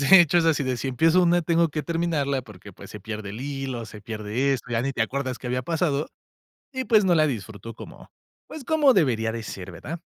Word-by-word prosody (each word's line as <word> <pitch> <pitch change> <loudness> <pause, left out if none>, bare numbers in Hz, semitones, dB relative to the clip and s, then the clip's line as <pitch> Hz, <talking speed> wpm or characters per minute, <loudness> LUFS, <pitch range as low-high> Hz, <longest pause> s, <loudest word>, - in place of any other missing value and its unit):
de 175 +7 +8
hecho, 175 +1 +4
es 165 - +2
así 160 -3 +2
de, 130 -1 -1
si 135 - -3
empiezo 160 +8 +3
una, 175 0 +3
tengo 165 +1 +2
que 150 0 -3
terminarla 160 -5 -1
porque, 105 -3 -13
pues, - - -13
se 105 - -9
pierde 105 0 -6
el 110 - -7
hilo, 135 -3 -4
se 105 -1 -11
pierde 110 +5 -1
esto, 125 -2 -4
ya 115 -1 0
ni 135 +1 -1
te 120 - 0
acuerdas 130 +1 -3
qué 125 - -8
había 125 +1 -1
pasado 155 -1 0 0.6
y, 260 -1 -3
pues, 215 -4 +4
no 180 - +4
la 155 -1 +4
disfruto 115 -3 -6
como, - - -12 0.4
pues, 310 - -8
como 295 -2 +4
debería 120 - +2
de 115 0 -5
ser, 95 -3 -7
¿verdad? 155 - -7
135 Hz, 230 wpm, -25 LUFS, 115-165 Hz, 0.6 s, de